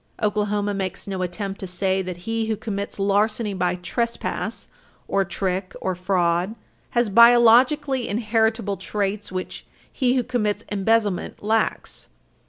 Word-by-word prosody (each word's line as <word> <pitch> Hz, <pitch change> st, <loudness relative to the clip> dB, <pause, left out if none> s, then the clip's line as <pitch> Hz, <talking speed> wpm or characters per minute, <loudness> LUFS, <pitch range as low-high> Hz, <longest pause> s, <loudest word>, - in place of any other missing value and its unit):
Oklahoma 210 Hz, -1 st, 0 dB
makes 190 Hz, -2 st, -4 dB
no 190 Hz, -2 st, -4 dB
attempt 195 Hz, +2 st, -4 dB
to 190 Hz, -, -5 dB
say 190 Hz, +1 st, 0 dB
that 180 Hz, -1 st, -7 dB
he 225 Hz, 0 st, -1 dB
who 220 Hz, -, 0 dB
commits 200 Hz, -1 st, -4 dB
larceny 205 Hz, +2 st, +1 dB
by 180 Hz, -1 st, 0 dB
trespass 235 Hz, +6 st, -3 dB, 0.4 s
or 195 Hz, -, +2 dB
trick 185 Hz, 0 st, -3 dB
or 185 Hz, -, -1 dB
fraud 180 Hz, +1 st, 0 dB, 0.4 s
has 240 Hz, -1 st, +4 dB
biologically 240 Hz, +4 st, +5 dB
inheritable 220 Hz, -1 st, 0 dB
traits 200 Hz, +2 st, -3 dB
which 185 Hz, 0 st, -5 dB, 0.3 s
he 255 Hz, -2 st, +2 dB
who 255 Hz, -, +2 dB
commits 220 Hz, -4 st, -1 dB
embezzlement 205 Hz, -1 st, 0 dB
lacks. 220 Hz, +1 st, -1 dB
205 Hz, 130 wpm, -23 LUFS, 190-225 Hz, 0.4 s, biologically